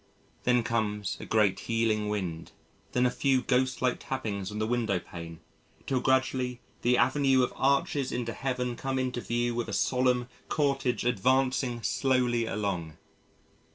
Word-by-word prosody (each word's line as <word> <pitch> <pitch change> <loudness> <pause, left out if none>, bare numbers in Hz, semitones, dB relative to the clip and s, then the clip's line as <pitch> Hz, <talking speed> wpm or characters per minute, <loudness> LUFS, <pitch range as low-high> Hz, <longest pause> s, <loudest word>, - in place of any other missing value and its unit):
Then 125 -1 +3
comes 105 -4 -1
a - - -8
great 100 -3 +3
healing 110 -2 +1
wind, 90 -6 -4 0.4
then 125 0 +3
a 125 - +3
few 130 -1 +2
ghost 130 0 +1
like 125 -1 +1
tappings 105 -7 -3
on 105 - -5
the 110 - 0
window 115 -4 0
pane 85 -2 -9 0.4
till 130 - +1
gradually 130 -1 +1 0.2
the 125 +1 +3
Avenue 130 +1 +3
of - - -1
Arches 140 0 +1
into 120 -2 -2
Heaven 125 -1 -2
come 135 +2 -2
into 125 -1 -1
view 120 +1 -1
with 120 0 -2
a - - -4
solemn 125 -1 +2 0.2
cortege 135 -5 0
advancing 125 +1 +1
slowly 125 -3 +1
along. 90 -8 -3
125 Hz, 150 wpm, -29 LUFS, 110-130 Hz, 0.4 s, Then